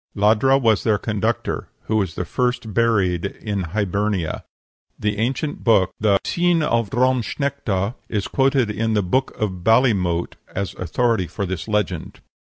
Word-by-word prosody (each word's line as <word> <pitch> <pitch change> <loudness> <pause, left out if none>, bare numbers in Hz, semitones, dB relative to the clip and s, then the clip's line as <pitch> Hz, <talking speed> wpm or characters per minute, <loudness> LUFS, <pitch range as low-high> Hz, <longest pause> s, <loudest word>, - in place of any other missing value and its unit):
Ladhra 110 +6 +4
was 115 -5 +3
their 110 -2 +2
conductor, 110 +2 -2
who 110 - 0
was 95 -6 -1
the 90 - -3
first 125 +2 -1
buried 100 -7 +2
in 100 -1 -3
Hibernia. 100 -1 -1 0.5
That 105 -1 -1
ancient 130 +6 -2
book, 105 -6 +4
the 100 -2 +3
"Cin 175 -2 +2
of 115 -6 +1
Drom 130 +2 +2
Snechta," 115 -7 -2 0.2
is 105 -3 -1
quoted 135 -4 +2
in 110 +1 -1
the 105 - +2
"Book 130 +9 0
of 95 -5 -2
Ballymote" 100 -7 +2 0.2
as 100 -1 -2
authority 95 +2 0
for 100 - -4
this 95 0 -4
legend. 105 -6 -2
105 Hz, 150 wpm, -21 LUFS, 95-120 Hz, 0.5 s, Ladhra